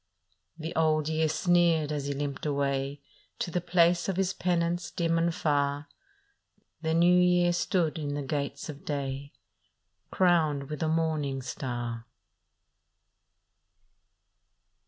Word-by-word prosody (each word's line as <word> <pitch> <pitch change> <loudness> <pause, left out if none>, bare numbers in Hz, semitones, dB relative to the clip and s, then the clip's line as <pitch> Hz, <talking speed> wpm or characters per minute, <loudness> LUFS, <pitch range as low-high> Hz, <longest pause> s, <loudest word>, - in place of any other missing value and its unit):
" 90 0 -42
The 160 +1 -5
Old 155 -2 +2
Year 160 0 +1
sneered 170 -2 +2
as 145 -2 -2
he 140 - -1
limped 140 0 -4
away 140 0 -1 0.4
To 175 - -3
the 180 - -1
place 170 +1 +3
of 190 - -1
his 190 -1 +1
penance 175 -1 0
dim 165 -1 0
and 170 +1 +2
far. 145 0 0 0.9
The 160 0 0
New 175 +2 +5
Year 180 -1 +4
stood 170 -2 0
in 145 -2 -3
the 145 - -3
gates 140 +1 -3
of 150 -2 -8
day, 140 -1 -4 0.8
Crowned 155 -6 +2
with 150 - -4
the 160 - 0
morning 155 -4 0
star. 120 -2 -4
155 Hz, 130 wpm, -28 LUFS, 140-170 Hz, 0.9 s, New